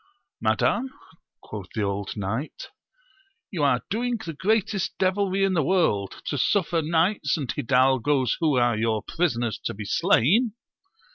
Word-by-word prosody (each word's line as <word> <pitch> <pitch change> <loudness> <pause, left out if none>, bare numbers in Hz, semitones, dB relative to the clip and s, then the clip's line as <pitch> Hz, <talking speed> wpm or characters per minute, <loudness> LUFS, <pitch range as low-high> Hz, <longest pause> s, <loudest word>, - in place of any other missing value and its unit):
Madam, 265 +2 +1 0.5
quoth 105 -4 -8
the 110 - 0
old 100 0 -3
knight, 110 +9 -4 0.8
you 170 -7 -2
are 130 -4 +2
doing 240 +3 0
the 165 - -5
greatest 200 +2 0
devilry 195 0 +1
in 195 -1 +2
the 170 - +2
world, 135 - 0
to 145 - -2
suffer 170 +1 +1
knights 165 0 +1
and 140 -5 -4
hidalgos 130 0 +2
who 155 -4 +2
are 120 -2 +3
your 110 -1 0
prisoners 120 - -1
to - - -3
be 105 +1 -7
slain. 205 - +3
150 Hz, 140 wpm, -25 LUFS, 120-190 Hz, 0.8 s, are